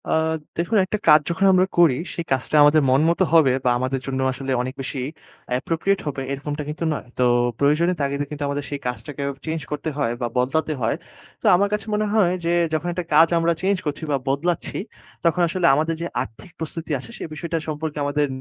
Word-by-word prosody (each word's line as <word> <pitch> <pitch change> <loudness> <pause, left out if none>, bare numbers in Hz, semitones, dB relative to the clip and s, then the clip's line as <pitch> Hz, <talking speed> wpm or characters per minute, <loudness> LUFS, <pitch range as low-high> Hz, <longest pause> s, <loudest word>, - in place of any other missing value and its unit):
আ - - 0 0.5
দেখুন, 175 +7 +1
একটা 215 - -2
কাজ 150 - +9
যখন 190 +3 +1
আমরা 185 0 +5
করি, 165 -7 +5 0.2
সেই 170 - -4
কাজটা 130 +2 0
আমাদের 150 +1 +6
মন 130 +2 +4
মত 170 - 0
হবে 155 -6 +6
বা - - +4
আমাদের 130 +2 -1
জন্য 135 -1 -2
আসলে 135 +1 -4
অনেক 130 +1 -4
বেশি 135 +1 -4 0.6
appropriate 170 +8 0
হবে 140 -2 -3
এরকমটা 145 +2 -4
কিন্তু 150 +2 -4
নয়। - - -5
তো - - +4 0.4
প্রয়োজনের 155 +5 +3
তাগিদে 140 +1 -1
কিন্তু 150 -1 -4
আমাদের 140 0 -2
সেই 145 - -4
কাজটাকে 140 +3 -5 0.2
চেঞ্জ 160 0 -2
করতে 150 +2 -2
হয় 140 -5 0
বা 120 - 0
বদলাতে 155 +5 +1
হয়। 115 - +1 0.5
তো - - -9
আমার 200 +3 +3
কাছে 210 0 -2
মনে 210 0 +1
হয় 200 -5 +4
যে - - +1 0.2
যখন 155 +2 -1
একটা 175 0 -4
কাজ 160 +2 +7
আমরা 165 0 +2
চেঞ্জ 195 +1 +2
করছি 150 +2 -3
বা 140 - +2
বদলাচ্ছি 155 +6 -1 0.5
তখন 170 +2 +3
আসলে 175 +1 -1
আমাদের 160 +3 0
যে - - -2 0.2
আর্থিক 130 +7 -9
প্রস্তুতি 160 0 -5
আছে 120 -2 -10
সে - - -6
বিষয়টা 165 +2 -3
সম্পর্কে 155 0 -4
আমাদের 145 +1 +1
155 Hz, 200 wpm, -22 LUFS, 140-170 Hz, 0.6 s, কাজ